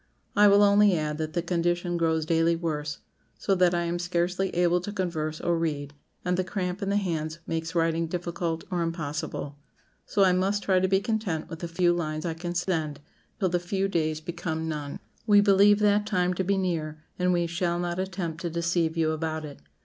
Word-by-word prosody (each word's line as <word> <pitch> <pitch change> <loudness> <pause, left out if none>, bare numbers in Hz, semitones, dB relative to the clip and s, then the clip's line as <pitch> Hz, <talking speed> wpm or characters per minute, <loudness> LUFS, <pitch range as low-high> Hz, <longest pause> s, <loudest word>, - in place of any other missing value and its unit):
I 205 +1 +7
will 200 +1 +6
only 205 -2 +5
add 150 0 -2
that 155 0 -3
the 170 - -1
condition 175 0 0
grows 160 -2 +1
daily 165 +1 +2
worse, 150 -3 -3 0.4
so 195 - 0
that 180 -2 +3
I 170 - +1
am 170 +1 -2
scarcely 175 +2 0
able 175 0 +3
to 205 - -5
converse 160 -6 -2
or 170 -1 0
read, 145 -3 -2 0.3
and 180 0 +1
the 185 - +1
cramp 185 0 -3
in 195 - -1
the 200 - +2
hands 160 -5 -2
makes 165 +1 -3
writing 165 0 +1
difficult 170 -1 -3
or 175 -1 0
impossible; 155 -3 -4 0.5
so 200 - +3
I 185 -1 +5
must 195 +3 +1
try 190 -2 +3
to 190 - +2
be 190 +1 +2
content 210 -8 -2
with 165 - -6
the 170 - -4
few 175 +1 +2
lines 155 -2 -3
I 165 - -1
can 175 +2 -5
send, 160 -5 -1 0.4
till 190 -3 +2
the 175 0 +1
few 190 +2 -1
days 155 -4 -1
become 160 -1 -4
none. 150 -2 -4 0.3
We 205 -1 +7
believe 205 0 +6
that 210 0 +3
time 180 -3 +1
to 190 - -1
be 195 +2 +1
near, 155 -5 -2 0.2
and 180 0 +2
we 175 -1 +2
shall 170 +1 -1
not 175 0 -2
attempt 180 -4 -3
to 175 - -2
deceive 170 0 0
you 160 -1 +2
about 155 0 -3
it. 145 - -10
175 Hz, 205 wpm, -27 LUFS, 160-185 Hz, 0.5 s, I